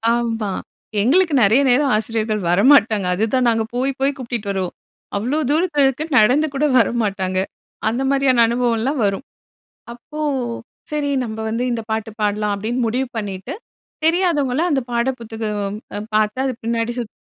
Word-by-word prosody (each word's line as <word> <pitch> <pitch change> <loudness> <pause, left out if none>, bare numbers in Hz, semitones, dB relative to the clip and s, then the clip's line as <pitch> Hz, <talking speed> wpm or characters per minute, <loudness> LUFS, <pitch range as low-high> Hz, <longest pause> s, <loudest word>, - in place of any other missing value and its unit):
ஆமா. 225 -4 -1 0.5
எங்களுக்கு 325 - +3
நிறைய 225 +7 +5
நேரம் 270 +1 +3
ஆசிரியர்கள் 215 -1 -1
வரமாட்டாங்க. 215 0 +4
அதுதான் 240 +5 +1
நாங்க 225 -1 +1
போய் 260 +2 0
போய் 275 +1 +1
கூப்டுட்டு 235 -5 -4
வருவோம். 190 -2 -3 0.4
அவ்வளோ 245 +9 -1
தூரத்தில 310 -1 +2
இருக்குனு 290 +2 -2
நடந்து 265 +9 +4
கூட 300 +2 +1
வரமாட்டாங்க. 200 -6 +1 0.5
அந்த 240 +4 -2
மாதிரியான 270 -4 +4
அனுபவம்லாம் 240 +3 0
வரும். 200 +7 -1 0.7
அப்போ, 300 +6 -10 0.7
"சரி 290 -1 -1
நம்ப 220 -1 -5
வந்து 230 +3 -1
இந்த 235 -1 -2
பாட்டு 220 0 -2
பாடலாம்" 210 0 0
அப்படின்னு 225 +5 -3
முடிவு 255 +3 -1
பண்ணிட்டு, 205 +5 -5 0.5
தெரியாதவங்கலாம் 330 -3 +2
அந்த 270 -3 +2
பாடல் 235 +2 +1
புத்தகம் 210 -3 -4 0.2
அ - - -2 0.2
பார்த்து 215 +3 +1
அது 260 - 0
பின்னாடி 230 0 -1
சுத் 235 -3 -6
235 Hz, 140 wpm, -20 LUFS, 215-270 Hz, 0.7 s, நிறைய